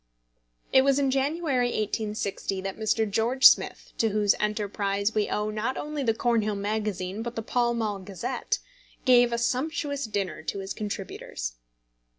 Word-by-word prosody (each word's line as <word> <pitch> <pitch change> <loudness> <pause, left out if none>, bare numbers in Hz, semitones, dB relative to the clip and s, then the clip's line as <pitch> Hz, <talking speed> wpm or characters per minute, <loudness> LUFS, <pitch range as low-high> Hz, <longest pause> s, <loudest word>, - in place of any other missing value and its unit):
It 265 - +8
was 275 0 +3
in 275 -2 +2
January, 275 -1 +1
1860, 210 -3 -2
that 195 0 -4
Mr. 220 0 +1
George 230 +6 +1
Smith - - +1
to 225 - +3
whose 210 -1 +3
enterprise 205 -1 -1
we 215 -1 +1
owe 210 0 -1
not 215 +5 -2
only 300 -1 -3
the 225 -4 +1
Cornhill 225 -3 +1
Magazine 205 -1 -2
but 235 +1 -5
the 225 - -3
Pall 240 +1 +1
Mall 215 -3 -1
Gazette 190 -2 -3 0.5
gave 245 -2 +6
a 235 - 0
sumptuous 285 +3 -1
dinner 205 -4 -3
to 160 - -4
his 195 0 -4
contributors. 195 - -5
220 Hz, 155 wpm, -27 LUFS, 205-245 Hz, 0.5 s, It